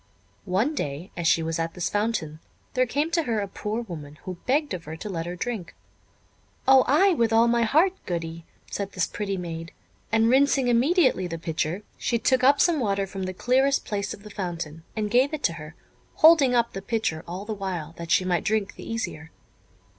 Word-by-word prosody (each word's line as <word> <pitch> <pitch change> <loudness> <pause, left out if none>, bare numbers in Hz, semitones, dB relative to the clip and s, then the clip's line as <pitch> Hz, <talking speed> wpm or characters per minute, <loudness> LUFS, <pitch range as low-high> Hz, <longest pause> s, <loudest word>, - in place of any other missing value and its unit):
One 215 +12 +1
day, 150 - -4
as 170 -2 -1
she 165 - +3
was 165 +1 -2
at 165 0 -2
this 180 - -1
fountain, 205 -8 -1 0.3
there 255 0 +2
came 290 +6 -1
to 335 0 +2
her 230 -8 -1
a 200 - -2
poor 210 +4 -4
woman, 155 -7 -9
who 185 -2 -6
begged 290 +3 +1
of 175 -3 -5
her 160 +1 -7
to 210 - -6
let 165 -3 -3
her 175 - -4
drink. 210 -2 -5 0.9
"O 265 -1 +7
ay, 365 +8 +5
with 230 -8 +1
all 225 +1 +5
my 235 0 +2
heart, 315 - +3
Goody," 165 -1 -4 0.3
said 200 -1 -4
this 180 - +1
pretty 200 -2 -3
maid; 165 -2 -6 0.4
and 225 0 +4
rinsing 270 0 +3
immediately 255 - +3
the 165 -1 -5
pitcher, 165 +3 -2 0.2
she 235 - 0
took 255 +2 +2
up 280 +2 +5
some 340 -4 +3
water 200 -4 0
from 190 0 -5
the 185 - -3
clearest 265 +6 +2
place 205 -1 -3
of 200 - -8
the 210 - -10
fountain, 170 -5 -5
and 210 -2 -2
gave 260 +5 +3
it 300 - -10
to 170 - +2
her, 155 0 -10 0.4
holding 310 -6 +6
up 235 -1 +2
the 195 - -5
pitcher 200 -6 -2
all 180 +4 -6
the 220 - -3
while, 180 -6 -4
that 170 -1 -6
she 185 - +3
might 175 -2 +1
drink 215 -2 0
the - - -9
easier. 165 -8 -4
205 Hz, 205 wpm, -25 LUFS, 170-250 Hz, 0.9 s, O